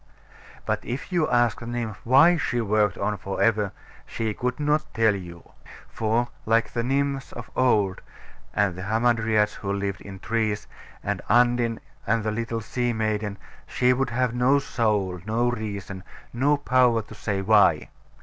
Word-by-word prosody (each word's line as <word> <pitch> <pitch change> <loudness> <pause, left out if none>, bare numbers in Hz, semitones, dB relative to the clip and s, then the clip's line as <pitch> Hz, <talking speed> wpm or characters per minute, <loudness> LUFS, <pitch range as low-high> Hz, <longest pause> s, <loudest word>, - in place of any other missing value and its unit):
But - - -1
if 130 +9 -5
you 175 -4 +1
asked 120 -4 +2
the 115 - -8
nymph 120 -3 -4
why 140 +9 +6
she 130 -6 -1
worked 105 -3 +1
on 105 -1 -1
for 95 0 -5
ever, 105 -3 +2 0.4
she 110 -2 -2
could 125 +4 -3
not 150 +1 0
tell 110 -1 +4
you. 85 -3 -10 0.4
For 115 +2 0 0.2
like 115 +1 +2
the 120 - 0
Nymphs 135 +2 -1
of 115 - -9
old, 105 -7 +2 0.5
and 100 -3 +1
the 90 - -7
Hamadryads 110 0 +1
who 100 - -4
lived, 100 -1 -3
in 95 -1 -9
trees, 110 0 -1 0.4
and - - -2
Undine, 120 -1 +3 0.3
and 115 +1 +1
the 110 - -1
little 115 +1 -3
Sea 120 +2 -1
maiden, 110 -2 -2 0.3
she 125 0 +2
would 130 0 -1
have 125 0 0
no 125 +3 +3
soul; 105 -9 0
no 120 +3 +1
reason; 100 -4 -5 0.3
no 140 +5 +2
power 125 -5 +3
to 105 - -13
say 100 -2 -3
why. 100 -6 +4
115 Hz, 160 wpm, -25 LUFS, 105-125 Hz, 0.5 s, why